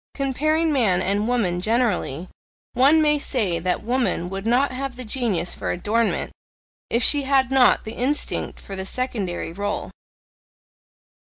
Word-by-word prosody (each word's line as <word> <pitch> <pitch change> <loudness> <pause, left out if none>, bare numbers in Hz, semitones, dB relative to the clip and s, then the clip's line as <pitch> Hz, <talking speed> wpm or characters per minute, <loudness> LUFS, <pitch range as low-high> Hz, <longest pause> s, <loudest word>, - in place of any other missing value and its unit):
Comparing 310 +4 0
man 215 -10 +2
and 200 +3 0
woman 205 -8 0
generally, 210 - 0 0.5
one 285 +6 +4
may 300 -1 +2
say 210 -12 -1
that 180 +3 -2
woman 235 -7 -1
would 195 +2 -5
not 255 +4 +2
have 260 0 -5
the 255 0 -8
genius 215 -7 -1
for - - -5
adornment, 215 +6 -1 0.6
if 235 +1 +1
she 290 +3 +7
had 270 -1 +1
not 265 -2 +4
the 220 - -6
instinct 270 +5 -1
for 195 - -8
the 190 - -4
SECONDARY 195 -7 -3
role. 205 +3 -4
235 Hz, 145 wpm, -22 LUFS, 195-265 Hz, 0.6 s, she